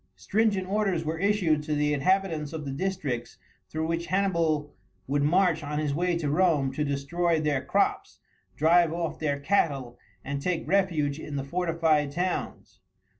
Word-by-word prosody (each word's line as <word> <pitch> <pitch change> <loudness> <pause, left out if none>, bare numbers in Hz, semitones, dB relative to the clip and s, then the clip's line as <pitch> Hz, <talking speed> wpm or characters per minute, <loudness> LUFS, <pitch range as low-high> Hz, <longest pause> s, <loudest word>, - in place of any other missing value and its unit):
Stringent 195 - 0
orders 195 -5 0
were 160 +1 -2
issued 185 -6 +2
to 150 0 -2
the 150 0 +1
inhabitants 165 0 0
of 155 -2 -5
the 135 - -4
districts 135 -8 -3 0.3
through 160 0 -2
which 165 +1 -2
Hannibal 170 -6 0 0.3
would 140 +2 0
march 170 +2 +3
on 150 +1 -3
his 150 -2 0
way 175 +3 0
to 160 -3 -2
Rome 150 -3 +2
to 150 - -1
destroy 155 +4 0
their 150 -3 0
crops, - - 0 0.4
drive 165 +2 +4
off 170 -1 -3
their 145 -2 -1
cattle, 140 -7 0 0.3
and 140 +1 -3
take 175 0 -2
refuge 160 -6 +1
in 150 -2 -7
the 135 - -2
fortified 160 -2 +1
towns. 180 +3 -3
160 Hz, 160 wpm, -27 LUFS, 145-180 Hz, 0.4 s, drive